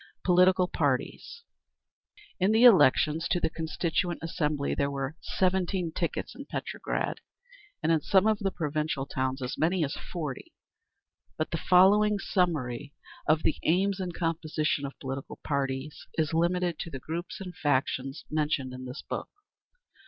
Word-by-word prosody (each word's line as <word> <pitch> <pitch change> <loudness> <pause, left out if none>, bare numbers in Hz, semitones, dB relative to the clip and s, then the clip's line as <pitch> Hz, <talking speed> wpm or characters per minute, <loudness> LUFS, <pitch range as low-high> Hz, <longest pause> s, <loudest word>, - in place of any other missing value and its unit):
Political 180 0 +4
Parties 145 - -2 1.0
In 190 +3 +3
the 225 +2 +4
elections 160 - +6
to 175 - +2
the 160 - 0
Constituent 165 +1 -1
Assembly, 150 -4 -1
there 140 0 0
were 140 +1 -3
seventeen 185 -2 0
tickets - - -3
in - - -10
Petrograd, - - -3 0.6
and 165 - +3
in 160 -2 +3
some 190 +4 +3
of 215 -1 +3
the 195 - 0
provincial 155 -4 -2
towns 130 0 -2
as 125 - -4
many 170 +2 +2
as 140 - -4 0.2
forty; 170 - -5 0.8
but - - -2
the - - -2
following 205 +3 +6
summary 145 - -1 0.3
of 155 0 +3
the 160 - +1
aims 190 +4 +2
and 180 -2 -4
composition 155 -3 -1
of 140 - -11
political 135 0 -6
parties 140 0 -3
is 160 -1 0
limited 175 0 +1
to - - -4
the 135 - -6
groups 165 +6 -5
and 180 -3 -7
factions 135 -3 -1
mentioned 150 -4 0
in 130 0 -7
this 125 0 -7
book. - - -5
160 Hz, 145 wpm, -28 LUFS, 140-180 Hz, 1.0 s, elections